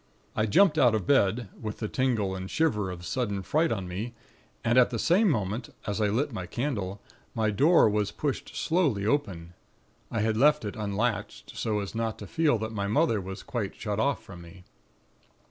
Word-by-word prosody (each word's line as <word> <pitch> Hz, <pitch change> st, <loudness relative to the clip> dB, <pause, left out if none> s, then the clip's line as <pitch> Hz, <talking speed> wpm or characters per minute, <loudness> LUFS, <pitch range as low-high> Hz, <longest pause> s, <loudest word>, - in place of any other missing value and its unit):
"I 110 Hz, -, +1 dB
jumped 155 Hz, -, +4 dB
out 120 Hz, -5 st, +5 dB
of 105 Hz, -5 st, -2 dB
bed, 115 Hz, -4 st, +2 dB
with 110 Hz, -2 st, -5 dB
the 110 Hz, -, -3 dB
tingle 110 Hz, -7 st, 0 dB
and 95 Hz, 0 st, -6 dB
shiver 105 Hz, -12 st, +1 dB
of 90 Hz, -1 st, -7 dB
sudden 105 Hz, -6 st, -2 dB
fright 160 Hz, -, +1 dB
on 95 Hz, -5 st, -2 dB
me; 105 Hz, +7 st, -5 dB, 0.5 s
and 120 Hz, +2 st, +4 dB
at 125 Hz, -, +5 dB
the 120 Hz, -, -3 dB
same 190 Hz, -, +3 dB
moment, 110 Hz, -, -1 dB, 0.2 s
as 105 Hz, +1 st, -2 dB
I 105 Hz, -, +3 dB
lit 125 Hz, +7 st, 0 dB
my 90 Hz, -5 st, -5 dB
candle, 100 Hz, -5 st, -3 dB, 0.4 s
my 110 Hz, -2 st, +1 dB
door 145 Hz, -, +5 dB
was 105 Hz, -1 st, +1 dB
pushed -, -, -4 dB
slowly 150 Hz, -, +1 dB
open; 95 Hz, -, -1 dB, 0.6 s
I 110 Hz, -, -1 dB
had 110 Hz, 0 st, +1 dB
left 150 Hz, 0 st, +4 dB
it 105 Hz, -, -4 dB
unlatched, 105 Hz, 0 st, -3 dB
so 105 Hz, -2 st, -1 dB
as 100 Hz, -, -6 dB
not 115 Hz, -1 st, -2 dB
to 105 Hz, -, -8 dB
feel 150 Hz, +2 st, +2 dB
that 110 Hz, +1 st, -4 dB
my 100 Hz, -2 st, -2 dB
mother 115 Hz, -2 st, +2 dB
was 95 Hz, +2 st, -7 dB
quite 110 Hz, -6 st, -4 dB
shut 105 Hz, -2 st, -3 dB
off 140 Hz, -2 st, 0 dB
from 95 Hz, -5 st, -11 dB
me. 90 Hz, +2 st, -13 dB
110 Hz, 195 wpm, -28 LUFS, 100-125 Hz, 0.6 s, out